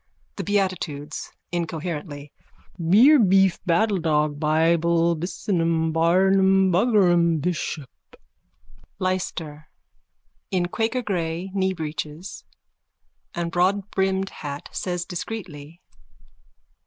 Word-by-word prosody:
_ - - -46
THE - - -4
BEATITUDES: 180 -7 -2 0.2
(Incoherently.) 160 -3 -4 0.5
Beer 220 - +6
beef 195 -3 +3
battledog 165 -6 +1
buybull 165 +2 +2
businum 165 -1 -1
barnum 190 +3 +3
buggerum 175 -5 +3
bishop. 155 -3 -3 1.1
LYSTER: 165 -5 -3 0.8
_(In 180 -2 +1
quakergrey 190 -7 -2
kneebreeches 170 -2 -4 0.9
and 170 -1 -2
broadbrimmed 190 +1 0
hat, 145 -1 -7
says 175 -1 -3
discreetly.) 175 -4 -7
175 Hz, 75 wpm, -23 LUFS, 160-190 Hz, 1.1 s, Beer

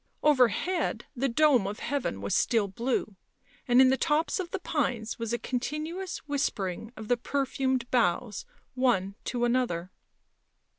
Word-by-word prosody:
Overhead 300 - +2
the 270 +2 0
dome 255 -5 +4
of 205 +1 -4
heaven 270 - -2
was 100 0 -2
still 225 -4 +2
blue, 225 0 -2 0.5
and 245 0 +5
in 260 0 +7
the 265 - +2
tops 310 +4 +1
of 360 -2 -3
the 390 - -2
pines 245 - -2
was 230 -1 -3
a 240 - +1
continuous 305 - -3
whispering 220 -7 -2
of 220 -1 -7
the 245 - +2
perfumed 265 -1 -1
boughs 225 -2 +1 0.3
one 240 -7 +1
to 240 -1 0
another. 235 -8 0
250 Hz, 145 wpm, -28 LUFS, 220-285 Hz, 0.5 s, in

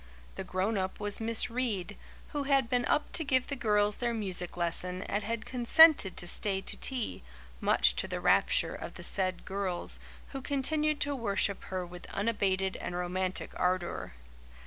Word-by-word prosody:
The - - -5
grown 195 +3 -1
up 190 0 -3
was 205 -1 -3
Miss 230 +1 +1
Reade, 230 -7 -2 0.3
who 290 -2 -3
had 270 -4 +2
been 245 0 +2
up 295 - +1
to 325 - 0
give 260 -3 +2
the 280 - -4
girls 210 -4 +2
their 240 -1 -1
music 185 -5 -3
lesson 180 +2 0
and 205 - -2
had 230 0 -3
consented 255 - +6
to - - -3
stay 190 +2 0
to - - -4
tea, 255 -4 -3 0.4
much 65 -1 +4
to - - 0
the - - -3
rapture - - +3
of - - -7
the - - -9
said 185 -2 -1
girls, 190 -2 -2 0.3
who 270 - -6
continued 300 +2 0
to 285 0 0
worship 205 -4 0
her 185 -1 -3
with 175 0 -11
unabated 195 -3 0
and 175 - -5
romantic 180 +1 -2
ardour. 180 - -1
205 Hz, 170 wpm, -30 LUFS, 185-250 Hz, 0.4 s, consented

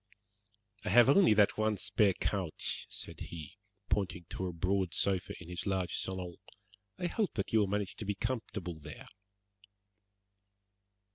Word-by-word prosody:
"I - - -2
have 120 +1 +7
only 180 - +6
that 105 0 +4
one 110 -1 +2
spare 100 +1 +3
couch," 95 -6 -2
said - - -5
he, 85 +5 -8 0.3
pointing 95 -3 -1
to 95 - -2
a - - -2
broad 90 +1 0
sofa 95 -2 +1
in 90 - -10
his 90 +3 -4
large 95 -2 0
salon; 90 -2 -3 0.6
"I 180 - -3
hope 205 +3 0
that 100 0 -2
you 110 - +6
will 105 - +3
manage 100 -1 -2
to 110 - -5
be 100 0 -1
comfortable 100 -7 -3
there." 75 - -9
95 Hz, 150 wpm, -33 LUFS, 90-105 Hz, 0.6 s, have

